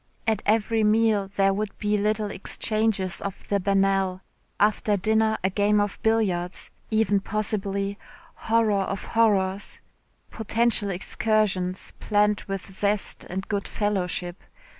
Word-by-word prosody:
At 220 -2 +1
every 220 +1 +2
meal 215 -2 +3
there 195 0 +3
would 205 +1 -4
be 210 0 0
little 210 0 0
exchanges 210 -2 0
of 200 -2 -6
the 200 - +2
banal, 195 -1 +1 0.4
after 210 0 +2
dinner 220 +2 +2
a 190 - +1
game 205 +2 +2
of 205 -1 -1
billiards 190 -6 0 0.2
even 215 -2 +2
possibly, 200 -1 -2 0.3
horror 220 -3 +1
of 195 0 -3
horrors, 200 -4 +1 0.5
potential 225 -1 0
excursions 190 -1 -1
planned 210 -1 +1
with 195 -1 -5
zest 200 +1 0
and 190 +2 -5
good 200 -1 -2
fellowship. 185 -4 -2
205 Hz, 120 wpm, -25 LUFS, 195-215 Hz, 0.5 s, meal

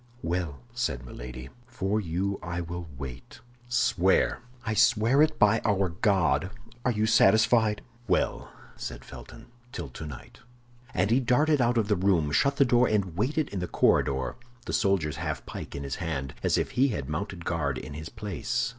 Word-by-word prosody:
"Well," 85 -4 -2
said 75 - -2
Milady, 65 +2 -8 0.2
"for 110 -4 -1
you 95 +3 -2
I 85 +1 -4
will 85 0 -5
wait." 65 -3 -8 0.3
"Swear." 120 -6 +2 0.3
"I 110 - 0
swear 115 +4 +4
it, 155 0 +3
by 105 +1 +4
our 100 -3 +2
God. 95 0 +1 0.3
Are 125 - +2
you 105 -1 +1
satisfied?" 110 0 +4 0.2
"Well," 90 - 0 0.2
said - - -7
Felton, 115 - -11 0.3
"till 85 - -6
tonight." 75 0 -9 0.6
And 100 +4 +2
he 120 - +5
darted 145 +4 +3
out 120 0 +2
of 110 -3 +2
the 105 - +2
room, 90 -5 +2
shut 140 - +2
the 140 - +4
door, 120 0 +4
and 100 -6 0
waited 140 - 0
in 100 - -4
the 90 - -2
corridor, 65 -1 +1 0.3
the - - -4
soldier's 80 -7 +1
half - - -4
pike - - -7
in 70 - -5
his 70 -1 -4
hand, 75 -7 -3
and - - -7
as - - +3
if - - -1
he 130 +3 +3
had 75 - -3
mounted 85 +3 -4
guard 70 -6 -1
in 65 - -7
his 80 +3 -7
place. 115 +3 -2
95 Hz, 175 wpm, -28 LUFS, 80-115 Hz, 0.6 s, he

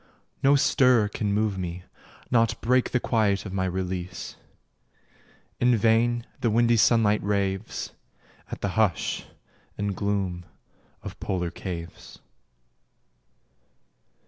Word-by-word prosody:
No 140 +1 +5
stir 125 -6 +4
can 105 -1 -2
move 105 -1 0
me, 90 0 -5 0.5
Nought 115 -2 +2
break 125 +2 +2
the 125 - +1
quiet 110 -5 +1
of 95 - -6
my 95 -1 0
release: 90 -1 -4 1.2
In 120 -1 +4
vain 115 +2 +2
the 115 - +1
windy 115 +1 +3
sunlight 105 -1 +4
raves 100 0 -2 0.6
At - - -7
the 100 - -1
hush 105 -4 0 0.5
and 100 -1 -2
gloom 95 -4 -2 0.6
of - - -8
polar 90 -3 -2
caves. 85 -3 -8
105 Hz, 110 wpm, -26 LUFS, 95-115 Hz, 1.2 s, No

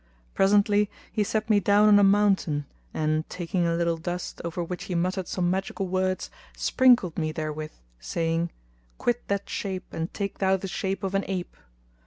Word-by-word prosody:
Presently 205 +1 +3 0.2
he 215 - +1
set 215 +1 -1
me 215 -2 +4
down 205 +2 +4
on 205 -1 +7
a - - +5
mountain, 195 -7 +3 0.3
and 155 0 -1
taking 175 0 -1
a 165 - +1
little 170 -1 +1
dust, 175 +2 -5
over 170 +1 -3
which 175 +1 -5
he 180 - -3
muttered 185 +1 -1
some 175 -1 0
magical 190 +1 -2
words, 185 0 -1 0.3
sprinkled 245 -11 +3
me 155 -1 -1
therewith, 155 0 -4 0.3
saying, 165 - -1 0.5
"Quit 240 0 0
that 200 0 -1
shape 190 -2 -4
and 165 +1 -3
take 200 -1 -4
thou 190 0 +3
the 195 - -6
shape 195 +1 -3
of 195 0 -2
an 195 0 +1
ape!" 185 -2 -4
185 Hz, 175 wpm, -26 LUFS, 170-200 Hz, 0.5 s, on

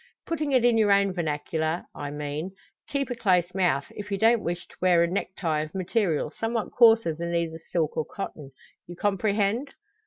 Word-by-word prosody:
Putting 310 -3 -2
it 255 -3 +4
in 235 -2 +4
your 210 -2 +4
own 200 -1 +3
vernacular, 160 0 -2
I 145 - -5
mean: 150 +5 -4 0.4
keep 275 -3 -2
a - - -1
close 180 -6 +2
mouth, 175 -7 +1
if 205 0 -8
you 200 - 0
don't 225 +2 +4
wish 175 +1 -3
to - - -17
wear 180 -2 +5
a - - +2
necktie 170 -3 -2
of 155 +2 -7
material 185 -5 0
somewhat 225 +2 -3
coarser 225 -7 +5
than 170 +2 -3
either 165 -1 -1
silk 160 -3 0
or 155 - -1
cotton. 155 -8 -7 0.4
You 175 - -8
comprehend?" 205 +6 0
185 Hz, 185 wpm, -26 LUFS, 160-220 Hz, 0.4 s, wear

